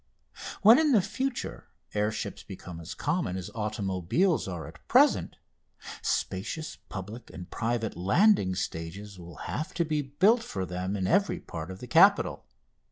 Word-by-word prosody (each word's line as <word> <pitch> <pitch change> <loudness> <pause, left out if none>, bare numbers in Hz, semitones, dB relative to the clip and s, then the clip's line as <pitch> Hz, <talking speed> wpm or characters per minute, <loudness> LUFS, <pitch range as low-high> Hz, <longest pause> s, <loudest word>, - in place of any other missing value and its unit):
When 225 +6 +9
in 305 -3 +3
the 215 - +6
future 265 +3 -3 0.3
air 105 +1 +1
ships 110 - -5
become 90 -3 -9
as 85 +1 -7
common 115 - -1
as 90 - -6
automobiles 105 - 0
are 85 -4 -5
at - - -14
present, - - +4 0.7
spacious 155 - -2
public 105 +5 -7
and 90 - -10
private 115 -1 -1
landing 100 - +3
stages 90 +3 -5
will 85 -1 -10
have 160 +6 -4
to 170 - +1
be 150 -1 0
built 185 - +3
for 95 - -4
them 90 +2 -3
in 95 -2 -1
every 180 - +2
part 80 - -7
of 95 +1 -8
the 125 - -7
capital. - - +4
105 Hz, 155 wpm, -28 LUFS, -, 0.7 s, When